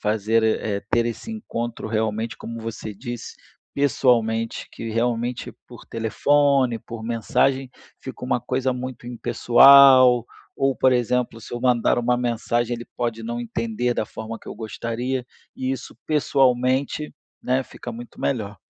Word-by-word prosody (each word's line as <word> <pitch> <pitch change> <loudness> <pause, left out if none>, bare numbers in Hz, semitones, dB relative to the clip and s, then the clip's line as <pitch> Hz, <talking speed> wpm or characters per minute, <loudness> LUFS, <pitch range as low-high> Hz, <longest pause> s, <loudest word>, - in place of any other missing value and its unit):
fazer 110 +2 +1
eh, 110 -2 0
ter 120 0 +2
esse 120 - -5
encontro 120 - -5
realmente, 110 0 -1
como 115 0 -7
você 110 -1 -6
disse, 120 +3 -7 0.4
pessoalmente, 115 -4 +1
que 115 - -6
realmente 120 +1 -1 0.2
por - - -12
telefone, 130 +2 +2
por 115 -1 -8
mensagem, 125 +3 0 0.3
fica 130 -1 -8
uma 125 - 0
coisa 130 +2 -1
muito 125 -1 -6
impessoal, 130 0 +6 0.3
ou 135 0 +1
por 130 - +4
exemplo, 125 -1 0
se - - -12
eu 120 - -4
mandar 125 -2 +2
uma 120 +1 +1
mensagem 120 0 -1
ele 120 - -9
pode 115 -2 -2
não 120 +1 -4
entender 115 +1 -2
da 110 - -1
forma 110 +1 -7
que - - -14
eu - - -6
gostaria, 120 +3 -4 0.3
e 130 0 -2
isso 130 -1 -7
pessoalmente, 135 -1 +1 0.3
né, 130 +1 +1
fica 120 - -9
muito 120 +1 -10
melhor. 105 -6 -2
120 Hz, 145 wpm, -23 LUFS, 115-130 Hz, 0.4 s, impessoal